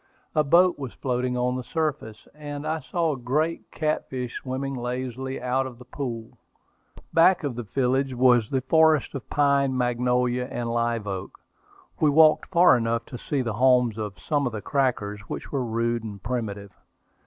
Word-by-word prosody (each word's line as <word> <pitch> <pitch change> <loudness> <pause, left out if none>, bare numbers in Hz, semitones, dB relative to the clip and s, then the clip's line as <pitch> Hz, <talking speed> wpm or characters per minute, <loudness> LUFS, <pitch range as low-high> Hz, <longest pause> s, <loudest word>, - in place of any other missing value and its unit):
A 155 - +3
boat 170 +3 +4
was 135 -4 -6
floating 125 -1 -2
on 125 +1 0
the 130 - -4
surface, 145 -9 -3
and 145 0 -7
I 160 +1 -1
saw 160 +1 -1
great 150 +7 -1
catfish 130 -5 -3
swimming 135 +1 -3
lazily 130 +1 -4
out 130 +1 0
of 125 -2 -10
the 125 - -13
pool. 120 -4 -6 0.7
Back 170 +2 +5
of 140 -3 -2
the 120 - -5
village 130 +3 0
was 120 -3 +4
the 135 -1 0
forest 160 +1 +3
of 140 -3 -7
pine, 140 -2 +2
magnolia, 125 0 +1
and 120 -1 -3
live 115 -2 0
oak. 95 -2 -6 0.6
We 155 - +4
walked 155 +1 +5
far 175 -6 +6
enough 115 0 -1
to 125 - -9
see 140 -3 -2
the 115 -3 -2
homes 125 -4 +4
of 105 -2 -5
some 145 -4 -1
of 120 - -4
the 105 - -4
crackers, 120 -7 0
which - - -6
were 135 -3 -1
rude 115 0 -1
and 100 -3 -8
primitive. 105 -5 -4
125 Hz, 170 wpm, -25 LUFS, 120-145 Hz, 0.7 s, far